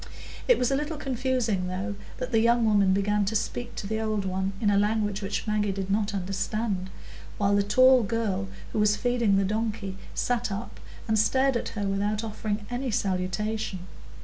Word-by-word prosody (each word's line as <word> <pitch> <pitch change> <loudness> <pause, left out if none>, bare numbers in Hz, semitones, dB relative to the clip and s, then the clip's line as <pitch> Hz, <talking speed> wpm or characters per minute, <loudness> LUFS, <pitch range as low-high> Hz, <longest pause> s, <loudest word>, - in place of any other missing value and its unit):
It - - +6
was 250 - +1
a - - +3
little 300 +2 -2
confusing, 250 -8 -1
though, 190 +3 -3 0.2
that 255 0 -4
the 225 - +4
young 235 +1 +4
woman 200 -3 +4
began 205 +2 +2
to 215 +3 -2
speak 240 +3 -2
to - - -5
the 220 +2 -2
old 215 -2 -1
one 190 +1 -1
in 205 -2 +2
a 200 - +3
language 210 -1 0
which 195 +1 -3
Maggie 210 -2 +1
did 195 0 -3
not 205 0 0
understand, 195 +1 -2 0.5
while 200 0 +2
the 205 - +4
tall 255 +5 +6
girl, 205 -3 -1 0.3
who - - 0
was 210 0 +4
feeding 245 -5 +2
the 195 - +2
donkey, 210 -2 -2 0.2
sat 245 -2 0
up 205 +5 -6 0.3
and 220 -1 +2
stared 265 +4 +3
at 235 - -1
her 205 - -1
without 205 +2 0
offering 215 -1 -3
any 250 +2 -2
salutation. 195 0 -1
210 Hz, 185 wpm, -27 LUFS, 195-230 Hz, 0.5 s, It